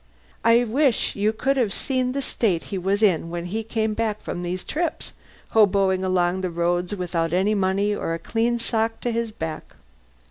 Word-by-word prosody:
(I 230 +1 +5
wish 255 +2 +1
you 205 +2 +2
could 270 +5 0
have 235 -6 +1
seen 255 +2 0
the 275 0 -2
state 195 -10 0
he - - 0
was 195 +4 0
in 170 -5 +3
when 170 0 -4
he 210 +5 -2
came 220 -1 -1
back 215 -1 -1
from 175 - -4
these 180 +1 -3
trips, 325 0 -3 0.4
hoboing 195 -3 +4
it - - -2
along 180 0 +1
the 185 - -1
roads 175 +3 0
without 170 -3 -2
any 190 +4 +2
money 200 +1 +1
or 165 -5 -2
a - - -3
clean 235 +6 0
sock 225 -1 0
to 240 - -1
his 230 0 -1
back. 160 -7 -6
205 Hz, 190 wpm, -23 LUFS, 180-230 Hz, 0.4 s, I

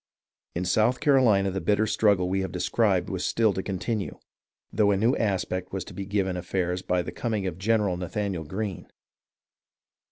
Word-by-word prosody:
In 90 +2 -1
South 110 +7 +2
Carolina 115 -9 +4
the 95 0 -3
bitter 105 +1 +2
struggle 105 -4 +2
we 95 +1 0
have 95 - -3
described - - +1
was - - -3
still 110 -3 +2
to 95 - -2
continue, 100 +2 -3 0.6
though 105 -1 +3
a 100 - +3
new 115 +6 +3
aspect 95 -3 -1
was 95 -1 -4
to - - -10
be 100 -1 -6
given 95 -2 0
affairs 90 0 -2
by 90 -1 0
the - - -6
coming 110 -5 -2
of 90 -2 -4
General 105 -3 +1
Nathanael 95 -1 -3
Greene. 95 +3 -5
100 Hz, 170 wpm, -26 LUFS, 90-110 Hz, 0.6 s, Carolina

